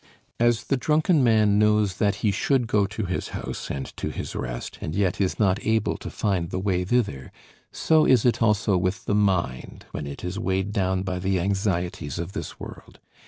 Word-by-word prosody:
As 120 0 +3
the 135 - 0
drunken 155 +2 +2
man 110 -3 +4
knows 105 -3 +2
that 100 -1 +2
he 105 - +4
should 125 +5 +1
go 105 -3 +2
to 105 +1 -4
his 90 0 -3
house - - -6
and 70 -1 -3
to - - -3
his - - -6
rest, - - -5
and 80 - -4
yet 95 -1 0
is 95 - 0
not 100 -2 +1
able 110 -1 +1
to - - -7
find 90 -5 -1
the - - -3
way 95 -1 0
thither, 95 - -1 0.4
so 160 -1 +3
is 125 -3 +4
it 120 - +2
also 105 -3 +3
with 90 +2 -2
the - - 0
mind, 95 -11 0
when 75 -1 -5
it 70 - -8
is 90 +3 -3
weighed 95 -1 -1
down 95 -2 0
by 90 -1 -3
the 95 0 0
anxieties 90 -5 -1
of 85 +2 -4
this - - -6
world. - - -11
100 Hz, 200 wpm, -25 LUFS, 90-110 Hz, 0.4 s, man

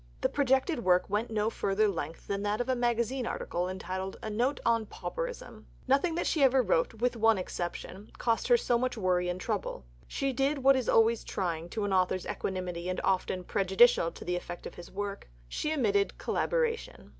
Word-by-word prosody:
The - - +2
projected 265 0 +1
work 180 -1 +3
went 210 +3 0
to - - -9
no 210 +1 +1
further 210 0 +1
length 170 -4 -4
than 200 0 -2
that 205 +1 -1
of 245 - -1
a 260 - +1
magazine 240 +1 0
article 175 +1 -2
entitled 190 0 -4
"A 220 - -3
Note 245 +6 0
on 230 -2 +2
Pauperism." - - -6 0.2
Nothing 280 +6 +2
that 345 - -1
she 315 - +1
ever 265 -1 +5
wrote - - +1
with 245 +2 0
one 225 -1 +4
exception 185 +2 -5
cost 230 -1 0
her 485 - +6
so 240 - +1
much 255 -1 -1
worry 180 -3 +1
and 180 +1 -3
trouble. 190 - -3 0.2
She 275 -1 -1
did 275 +2 0
what 275 0 +7
is 255 -3 -1
always 225 0 +4
trying 170 -3 -3
to 215 +2 -3
an 200 - -1
author's 185 0 +1
equanimity 180 -2 -3
and 185 - -2
often 185 -1 0
prejudicial 190 0 +4
to - - -10
the 180 - -1
effect 175 0 -6
of - - -7
his 175 - -11
work: 200 - -5 0.2
she 300 - -2
admitted 210 -10 +1
collaboration. 485 0 -1
220 Hz, 195 wpm, -30 LUFS, 185-260 Hz, 0.2 s, what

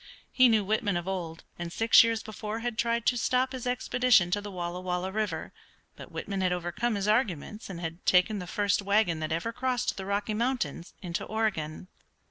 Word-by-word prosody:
He 255 -1 +6
knew 220 -2 +3
Whitman 205 -2 +1
of 175 +1 -5
old, 170 -4 -4 0.2
and 170 -1 -4
six 225 +5 +6
years 230 -1 0
before 215 +1 -5
had 240 -1 -2
tried 235 0 0
to 245 - +3
stop 255 +2 +1
his 255 -1 -5
expedition 245 -6 +3
to 205 - +1
the 205 - -7
Walla 180 -1 -4
Walla 180 +1 -2
River, 200 -6 -3 0.4
but - - -11
Whitman 195 -1 -4
had 185 -1 +2
overcome 180 +7 -1
his 200 0 -2
arguments, 210 - 0
and 180 -3 -6
had 165 +1 -6
taken 190 +3 +3
the 180 - -6
first 205 +2 +1
wagon 200 -4 +2
that 155 0 -3
ever 170 +9 -2
crossed 255 -1 -1
the 190 - -5
Rocky 200 +2 -1
Mountains 215 - -2
into 170 -1 -3
Oregon. 195 -8 -2
205 Hz, 195 wpm, -28 LUFS, 175-230 Hz, 0.4 s, He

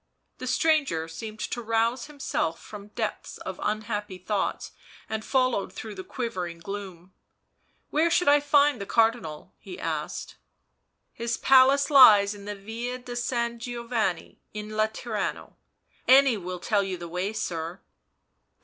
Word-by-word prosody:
The 255 - -5
stranger 275 - +2
seemed 215 +6 -8
to 240 - -3
rouse 230 +3 0
himself 265 - -2
from 205 -1 -10
depths 210 - -4
of - - -7
unhappy 210 -2 -2
thoughts, 195 +2 -2 0.4
and 220 0 -3
followed 255 -6 +1
through 220 -1 -7
the 190 -1 -7
quivering 185 -10 -4
gloom. 185 0 -8 0.4
" - - -43
Where 320 +3 +3
should 340 0 +2
I 290 +1 +7
find 285 -3 +3
the 200 - -5
Car 225 -1 +5
dinal 160 -11 -8
1" - - -26
he - - -9
asked. - - -4 0.4
" - - -50 0.3
His 235 0 -2
palace 270 +2 +5
lies 210 -7 +8
in 200 -1 -11
the 205 0 -4
Yia 230 +5 -5
di 245 - -6
San 235 -1 -1
Giovanni 235 -6 -3
in 210 0 -5
Laterano, 215 0 -2 0.5
any 265 -1 +7
will 180 -2 -5
tell 205 +3 +1
you 190 -2 -3
the 170 0 -7
way, 180 +4 -2
sir." 175 -4 -4
220 Hz, 150 wpm, -27 LUFS, 195-245 Hz, 0.5 s, lies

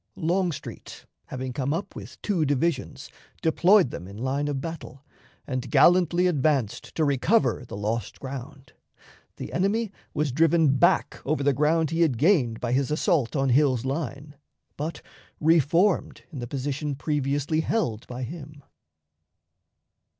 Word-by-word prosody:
Longstreet, 170 -3 -3 0.2
having 130 0 -5
come 140 +2 -1
up 190 - -5
with - - -10
two 190 -7 +1
divisions, 145 0 -1 0.3
deployed 175 - +4
them 90 - -7
in 100 +1 -10
line 135 +5 -1
of 145 -2 -2
battle, 145 -3 -8 0.4
and 130 -2 -4
gallantly 175 0 +4
advanced 145 - 0
to 160 - +2
recover 140 - +1
the - - -7
lost 105 +1 -3
ground. 135 0 -8 0.6
The - - -8
enemy 200 +4 0 0.2
was 150 -2 -1
driven 155 0 +3
back - - +2
over 145 0 -1
the 140 0 +3
ground 155 +3 +1
he 165 +1 0
had 150 -8 +2
gained 135 - +2
by 120 - -2
his 135 +2 +1
assault 150 -4 +1
on 135 -1 +1
Hill's 130 -2 +3
line, 140 +1 -4 0.4
but 155 +3 -5 0.4
reformed 165 +4 +2
in 145 - -7
the 120 - -5
position 140 +2 -3
previously 145 +1 -1
held 160 - -1
by 125 +1 -6
him. 145 +1 -9
145 Hz, 140 wpm, -25 LUFS, 130-165 Hz, 0.6 s, deployed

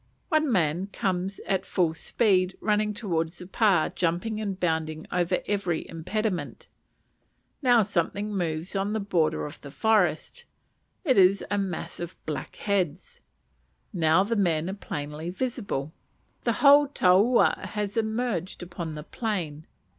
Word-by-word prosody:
One 310 -4 +2
man 175 -1 +1
comes 190 -1 -2
at 190 -1 0
full 170 -5 +1
speed, 185 0 +1
running 210 0 +1
towards 170 -6 -2
the 180 - -8
pa, 190 -3 +3
jumping 180 +6 -1
and 195 -3 -3
bounding 160 -2 -1
over 180 0 0
every 195 -5 -1
impediment. 175 0 -3 0.9
Now 245 -4 +5
something 200 +2 -1
moves 165 -1 -2
in 195 +2 0
the 220 - 0
border 165 -6 0
of 150 - -9
the 140 - -9
forest, 215 - +1 0.6
it 260 - +4
is 190 +1 +5
a 205 - +1
mass 190 -4 -4
of 175 +1 -6
black 155 -2 -5
heads. 200 - -2 0.7
Now 165 0 +4
the 230 +3 -1
men 175 -4 +1
are - - -4
plainly 155 -4 -5
visible. 200 - -3 0.5
The - - +3
whole 285 +1 +8
taua 210 -1 +4
has 210 -1 -4
emerged 220 -6 -2
upon 170 -3 -6
the 150 - -6
plain. 170 -8 -4
190 Hz, 140 wpm, -27 LUFS, 165-210 Hz, 0.9 s, whole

